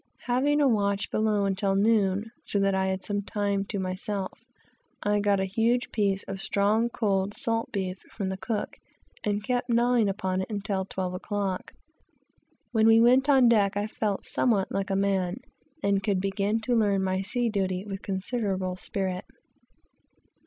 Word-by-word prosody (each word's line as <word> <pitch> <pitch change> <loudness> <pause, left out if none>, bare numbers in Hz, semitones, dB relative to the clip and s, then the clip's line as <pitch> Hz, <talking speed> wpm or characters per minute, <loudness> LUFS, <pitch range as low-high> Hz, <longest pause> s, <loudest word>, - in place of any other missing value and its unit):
We 245 - +1
had 290 +4 +2
a 285 - +4
watch 200 -4 +1
below 215 -2 +1
until 195 0 0
noon, 205 0 +2
so - - -1
that 195 0 +2
I 190 0 +1
had 190 0 -2
some 205 -1 -1
time 200 -1 -1
to 205 - -4
myself; 190 +1 -3 0.7
and 205 0 +2
getting 200 -2 +2
a - - 0
huge 230 +5 +1
piece 200 -2 0
of 195 - -5
strong, 210 +5 +2
cold, 200 -4 0
salt 230 -3 -1
beef 190 -2 -3
from 195 -3 -3
the 190 - -3
cook, 205 +2 -4 0.4
I 205 -1 0
kept 245 +2 -1
gnawing 235 -2 +3
upon 190 -1 -1
it 190 - -5
until 200 -2 -2
twelve 185 -1 -4
o'clock. 195 0 -3 1.0
When 220 -2 +3
we 225 0 +7
went 255 +4 +5
on 265 -3 +6
deck 205 -4 +3
I 205 - 0
felt 210 -2 -2
somewhat 210 -6 +1
like 195 0 -2
a 195 - 0
man, 195 -2 +1 0.5
and 200 -1 +2
could 195 -1 0
begin 200 +3 0
to 245 +2 -1
learn 200 -4 +2
my 190 0 0
sea 240 +5 -1
duty 190 -3 -1
with 195 -1 -6
considerable 190 -2 -2
spirit. 185 -1 -2
200 Hz, 170 wpm, -27 LUFS, 190-225 Hz, 1.0 s, we